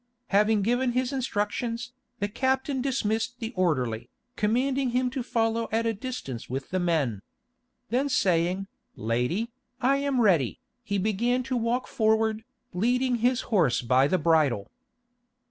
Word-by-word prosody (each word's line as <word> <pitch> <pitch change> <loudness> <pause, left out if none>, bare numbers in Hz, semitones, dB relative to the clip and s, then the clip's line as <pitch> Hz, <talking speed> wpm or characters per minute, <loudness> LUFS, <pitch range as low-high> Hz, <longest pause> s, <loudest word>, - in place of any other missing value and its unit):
Having 210 +1 +3
given 245 +3 +1
his 255 +2 0
instructions, 235 0 -2 0.2
the 205 - -1
captain 265 +4 0
dismissed 240 -3 -1
the 230 0 -5
orderly, 130 - 0 0.3
commanding 255 +5 +1
him 250 +1 0
to 265 0 -3
follow 230 -1 0
at 225 +1 +1
a 225 - +1
distance 205 - -6
with 135 +5 -4
the 185 - 0
men. 150 - 0 0.7
Then 265 +4 +1
saying, 185 -3 +1 0.3
"Lady, 125 - -1 0.3
I 270 +2 +3
am 280 -2 0
ready," 175 - +3 0.2
he 200 - -1
began 225 +6 +1
to 260 0 -2
walk 240 +2 0
forward, 220 0 +1 0.3
leading 245 +6 +1
his 245 +2 +2
horse 135 - +3
by 130 +3 +4
the 185 - +2
bridle. 150 - +2
225 Hz, 140 wpm, -27 LUFS, 175-250 Hz, 0.7 s, by